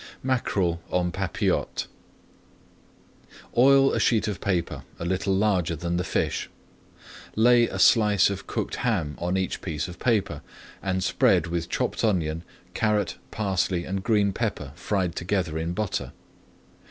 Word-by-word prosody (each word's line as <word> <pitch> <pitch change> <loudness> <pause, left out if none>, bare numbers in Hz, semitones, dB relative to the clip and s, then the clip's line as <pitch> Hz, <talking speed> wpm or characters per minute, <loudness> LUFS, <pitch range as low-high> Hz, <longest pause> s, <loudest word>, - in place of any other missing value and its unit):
MACKEREL 100 -10 0
EN 90 -1 +1
PAPILLOTES 95 -1 -1 1.7
Oil 135 +2 +6
a - - +1
sheet 110 -2 +2
of 105 -2 -4
paper 90 -4 -1 0.2
a 85 - -5
little 95 +2 0
larger 95 -4 +1
than 85 +2 -2
the 90 - 0
fish. - - -1 0.9
Lay 120 +1 +5
a - - -5
slice 105 -4 +5
of 95 -1 -6
cooked - - -3
ham 75 -1 0
on 90 +2 -1
each 95 -2 -2
piece 75 -2 -3
of 90 - -10
paper, 115 -5 0 0.4
and 95 -1 -1
spread - - +3
with 85 0 -3
chopped - - -1
onion, 85 -7 +1 0.3
carrot, 105 0 0
parsley, 95 -4 -1
and 95 +1 -3
green 105 -2 +2
pepper 100 - -3
fried 90 +1 -2
together 85 -3 -1
in 85 +2 -2
butter. 105 -1 -3
95 Hz, 140 wpm, -25 LUFS, 85-105 Hz, 1.7 s, Oil